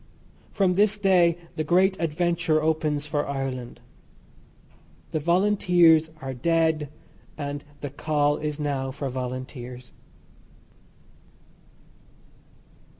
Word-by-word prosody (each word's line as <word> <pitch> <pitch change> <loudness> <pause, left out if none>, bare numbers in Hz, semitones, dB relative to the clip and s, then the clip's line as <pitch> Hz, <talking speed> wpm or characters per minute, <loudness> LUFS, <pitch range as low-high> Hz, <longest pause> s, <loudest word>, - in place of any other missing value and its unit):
From 190 -2 +1
this 210 +2 +3
day 180 -4 +3 0.2
the 155 - 0
great 185 +4 +3
adventure 170 0 +1
opens 155 -2 0
for 150 -1 -2
Ireland. 135 -3 -4 1.3
The 155 - -1
Volunteers 175 -2 +4
are 135 0 -4
dead, 160 +2 +1 0.5
and 145 -1 -5 0.2
the 145 - -5
call 145 0 0
is 150 -1 -4
now 140 -3 -2
for 135 +1 -4
volunteers. 125 -1 -6
155 Hz, 90 wpm, -25 LUFS, 140-170 Hz, 1.3 s, Volunteers